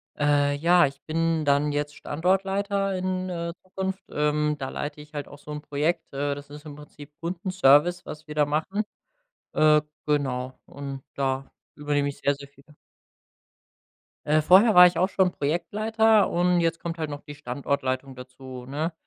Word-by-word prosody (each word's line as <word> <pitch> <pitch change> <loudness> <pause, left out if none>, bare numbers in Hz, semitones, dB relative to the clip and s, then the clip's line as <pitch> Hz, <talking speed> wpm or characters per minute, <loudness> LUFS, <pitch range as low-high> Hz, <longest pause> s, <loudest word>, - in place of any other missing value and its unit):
Äh, 145 -1 +2
ja, 170 +1 +4
ich 140 0 -10
bin 165 -1 0
dann 145 +1 +2
jetzt 145 0 -2
Standortleiter 195 +4 0
in, 185 0 -2
äh, 170 -1 -4
Zukunft. 190 +1 -4
Ähm, 150 0 0
da 130 -2 -4
leite 150 +1 -5
ich 150 +1 -16
halt 145 -2 -5
auch 145 - -12
so 150 +1 -11
'n 150 - -5
Projekt, 150 +3 -2
äh, 145 +1 -1
das 145 0 -10
ist 150 +1 -11
im 150 -2 -9
Prinzip 150 0 -13
Kundenservice, 175 -2 +2
was 155 +1 -9
wir 150 - -6
da 150 - +3
machen. 160 +8 -1 0.7
Äh, 155 -1 +5 0.2
genau 130 -4 -1
und 140 -1 -7
da 135 0 -1 0.3
übernehme 145 -1 0
ich 140 - -8
sehr, 140 0 +1
sehr 140 0 -11
viel. 140 0 -23 1.6
Äh, 155 +1 +3
vorher 195 +8 +6
war 180 0 +10
ich 175 -1 -2
auch 185 +2 +2
schon 190 -2 +2
Projektleiter 215 +8 +2
und 175 +1 +2
jetzt 165 0 0
kommt 170 -1 -5
halt 155 -2 -3
noch 145 0 -6
die 145 -1 -10
Standortleitung 135 0 -3
dazu, 125 0 -10
ne? 155 +5 -2
150 Hz, 170 wpm, -25 LUFS, 145-175 Hz, 1.6 s, war